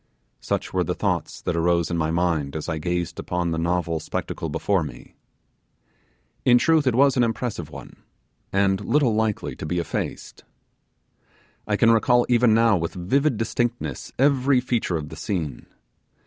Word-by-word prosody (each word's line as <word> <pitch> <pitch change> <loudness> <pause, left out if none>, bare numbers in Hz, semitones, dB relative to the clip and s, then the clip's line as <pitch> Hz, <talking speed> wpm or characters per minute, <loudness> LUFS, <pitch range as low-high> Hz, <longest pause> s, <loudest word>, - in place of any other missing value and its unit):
Such - - -3
were - - +2
the - - -2
thoughts - - -2
that 85 - -1
arose 85 0 +1
in - - 0
my 80 -1 0
mind 80 -4 0
as 80 - -4
I 80 - -2
gazed 85 +1 -2
upon 90 -1 -2
the 80 - -1
novel 85 -1 0
spectacle 80 +1 -4
before 90 +5 0
me. 75 - -10 1.3
In 125 -1 +6
truth 160 +1 +3
it 125 - +2
was 140 +1 +4
an 125 - +4
impressive 115 - -2
one, - - -11 0.5
and 95 0 +2
little 135 -1 +2
likely 110 -1 -1
to - - -6
be 90 - -1
effaced. 85 - -4 1.2
I 105 - +1
can 115 +2 +4
recall 120 +2 +4
even 120 -2 +4
now 115 -3 +4
with 85 +3 -3
vivid 130 +9 +1
distinctness 115 - -2
every 135 -1 +3
feature 120 -8 -1
of 75 -1 -6
the - - -9
scene. 85 -9 -4
95 Hz, 160 wpm, -24 LUFS, 85-120 Hz, 1.3 s, In